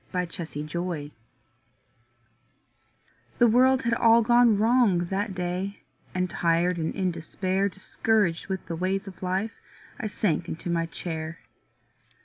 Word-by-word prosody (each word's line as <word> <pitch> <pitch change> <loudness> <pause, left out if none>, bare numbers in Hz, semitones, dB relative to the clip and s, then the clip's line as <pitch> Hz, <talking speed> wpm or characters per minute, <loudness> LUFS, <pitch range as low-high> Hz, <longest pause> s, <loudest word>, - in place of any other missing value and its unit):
MY 180 -1 0
COMFORTER 165 -2 -5 2.3
The 240 - +5
world 260 +3 +4
had 235 0 +1
all 230 0 +5
gone 240 -2 +5
wrong 225 -3 +4
that 190 +3 -2
day 180 +3 -3 0.3
And 185 0 +1
tired 170 +1 +1
and 160 - -2
in 185 -2 0
despair, 185 +4 -1
Discouraged 195 -2 0
with 190 -2 -4
the 165 - -4
ways 190 +4 -1
of 190 - -10
life, 190 +4 -1 0.5
I 220 - -2
sank 180 -4 -1
into 170 +2 -4
my 165 -1 0
chair. 165 -1 -5
185 Hz, 125 wpm, -26 LUFS, 170-210 Hz, 2.3 s, The